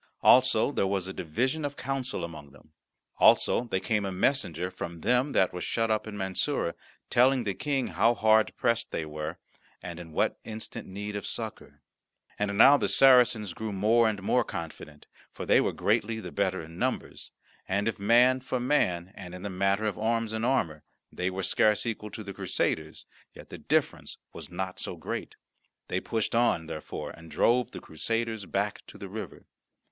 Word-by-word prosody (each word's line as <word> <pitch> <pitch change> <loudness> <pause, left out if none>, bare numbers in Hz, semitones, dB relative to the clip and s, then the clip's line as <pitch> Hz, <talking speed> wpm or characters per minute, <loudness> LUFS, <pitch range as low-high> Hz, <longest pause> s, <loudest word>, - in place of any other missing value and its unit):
Also 130 0 +5
there 100 - 0
was 95 -1 -1
a 95 - -5
division 125 - -1
of 145 -1 -3
counsel 135 -6 -3
among 75 -4 -8
them. 75 +2 -20 0.5
Also 120 - +5
there 95 -5 -1
came 105 0 0
a 100 - -2
messenger 90 - 0
from 85 -2 -7
them 125 - +2
that 95 - +3
were 90 - -5
shut 115 -1 0
up 110 0 0
in 105 -1 -6
Mansoura, 95 - 0 0.4
telling 130 +1 +4
the 100 -3 -1
King 135 +3 -1
how 115 +2 +3
hard 110 -1 +4
pressed 115 -1 0
they 80 - -3
were, 75 +2 -5 0.4
and 85 -1 -8
in 85 -2 -10
what - - 0
instant 110 0 -6
need 105 +2 -6
of 100 - -4
succour. - - -6 0.6
And 100 -1 -1
now 140 +6 +8
the - - 0
Sacarens 120 -7 +5
grew 110 -1 -5
more 110 +4 +3
and 100 -3 -4
more 125 +5 +2
confident, 75 -2 -8 0.3
for - - -7
they - - +5
were - - 0
greatly 110 +1 0
the - - -7
better 95 -3 -1
in 80 +2 -11
numbers; - - -3 0.4
and 100 +3 0
if, 115 - -2
man 120 +5 +5
for 130 0 -3
man 95 -10 +1
and 90 -2 -9
in 90 - -9
the 100 - -4
matter 100 +3 +1
of 105 - -2
arms 115 0 0
and 110 0 -2
armour, 100 - 0 0.3
they 90 +1 -2
were 95 +1 -4
scarce 105 +4 +2
equal 105 -2 -4
to 110 - -8
the 100 -1 -7
Crusaders, - - -2 0.3
yet - - -13
the - - -9
difference - - -1 0.2
was - - -9
not 95 +1 -5
so - - -5
great. - - -5 0.5
They - - 0
pushed 110 -2 -2
on, 115 -8 +2
therefore, 80 -1 -6
and 85 0 -13
drove 120 +6 +2
the - - -8
Christians 115 +5 -3
back 100 +1 -2
to - - -12
the - - -7
river. - - -8
105 Hz, 185 wpm, -28 LUFS, 90-115 Hz, 0.6 s, now